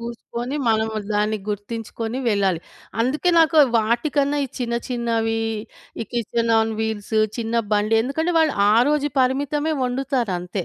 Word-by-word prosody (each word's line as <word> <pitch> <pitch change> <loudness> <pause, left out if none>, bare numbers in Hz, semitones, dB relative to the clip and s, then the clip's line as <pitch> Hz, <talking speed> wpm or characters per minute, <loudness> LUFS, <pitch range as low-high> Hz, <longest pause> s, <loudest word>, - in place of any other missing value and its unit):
చూసుకొని 235 +3 -5
మనము 220 0 +1 0.2
దాన్ని 210 +1 +1
గుర్తించుకొని 225 +3 -4
వెళ్ళాలి. 195 -5 +1 0.4
అందుకే 285 +9 +1
నాకు 320 0 +4 0.2
వాటికన్నా 275 +6 +1
ఈ - - -3
చిన్న 240 -2 -2
చిన్నవి, 230 -2 -1 0.6
ఈ 225 - -2
కిచెన్ 230 0 0
ఆన్ 220 0 +1
వీల్స్ 220 -1 -2 0.2
చిన్న 230 0 -1
బండి. 210 +1 +2
ఎందుకంటే, 320 +7 -1
వాళ్ళు 315 -2 +3 0.2
ఆ - - +5 0.2
రోజు 295 -1 +1
పరిమితమే 285 +4 0
వండుతారంతే. 235 -9 -2
235 Hz, 130 wpm, -22 LUFS, 220-270 Hz, 0.6 s, ఆ